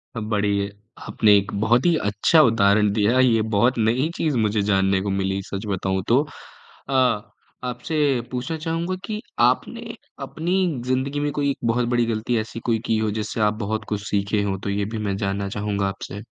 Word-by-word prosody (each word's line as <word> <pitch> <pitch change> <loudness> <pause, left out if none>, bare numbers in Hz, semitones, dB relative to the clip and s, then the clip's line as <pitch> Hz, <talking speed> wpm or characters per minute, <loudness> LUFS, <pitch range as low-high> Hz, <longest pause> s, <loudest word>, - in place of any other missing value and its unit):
अ, - - -2
बड़ी, 100 -2 0 0.4
आपने 105 -2 +4
एक 100 0 -1
बहुत 120 +5 +3
ही 175 -2 +4
अच्छा 105 +10 +4
उदाहरण 105 -4 +4
दिया 110 +4 +2
ये 120 -4 +4
बहुत 120 +5 +3
नई 120 +7 +1
चीज़ 150 -5 0
मुझे 105 -1 +1
जानने 95 -1 +2
को 100 - -3
मिली 95 0 -1
सच 100 +2 -4
बताऊँ 95 -1 -1
तो 125 +4 +4 0.7
अ, - - -2 0.7
आपसे 125 +5 -4 0.4
पूछना 130 +6 -3
चाहूँगा 165 +3 -2
कि 215 -1 -4 0.3
आपने 230 - -2 0.3
अपनी 155 +6 -3 0.3
ज़िंदगी 130 +3 -1
में 145 0 -1
कोई 140 0 0
एक - - -5
बहुत 120 +1 +1
बड़ी 120 -1 +2
गलती 115 +1 -1
ऐसी 110 +1 -5
कोई 115 -2 +1
की 110 - +1
हो 110 -1 0
जिससे 110 +1 -3
आप 105 0 +3
बहुत 110 +1 -2
कुछ 105 -1 -2
सीखे 100 +1 0
हो। 95 -1 -1
तो 100 - -2
ये 100 0 -1
भी 110 +1 -5
मैं 100 -2 -2
जानना 100 -1 -2
चाहूँगा 100 -1 -1
आपसे? 95 +1 -6
110 Hz, 185 wpm, -23 LUFS, 100-130 Hz, 0.7 s, आपने